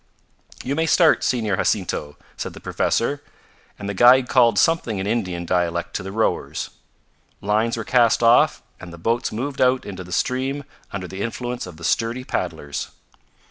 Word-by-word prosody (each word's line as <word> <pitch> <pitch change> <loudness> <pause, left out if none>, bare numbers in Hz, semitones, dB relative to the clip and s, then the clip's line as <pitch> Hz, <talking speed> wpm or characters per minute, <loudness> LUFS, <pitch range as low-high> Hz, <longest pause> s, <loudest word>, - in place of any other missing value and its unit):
"You 135 - -2
may 160 +3 0
start, 165 -1 +4
Senor 110 -6 0
Jacinto," 75 0 -1 0.2
said - - -5
the - - -9
professor, 140 +5 -1 0.6
and 100 - -6
the 100 - -2
guide 125 +5 +6
called 120 -5 +4
something 165 -9 +2
in 95 - -3
Indian 95 -6 -2
dialect 85 -1 -1
to - - -1
the 95 +1 -6
rowers. 110 +2 -1 0.7
Lines 110 +3 0
were 115 - -3
cast 120 0 +3
off 115 +1 +4 0.2
and 90 - -10
the 85 - -10
boats 115 +8 -1
moved 130 +5 -4
out 130 0 +3
into 95 -2 -7
the 90 - -13
stream 130 +8 -1 0.3
under 95 -2 -5
the 95 +2 -7
influence 120 0 -4
of 85 -3 -11
the 85 - -13
sturdy 115 +7 0
paddlers. 80 - -4
115 Hz, 170 wpm, -22 LUFS, 95-125 Hz, 0.7 s, guide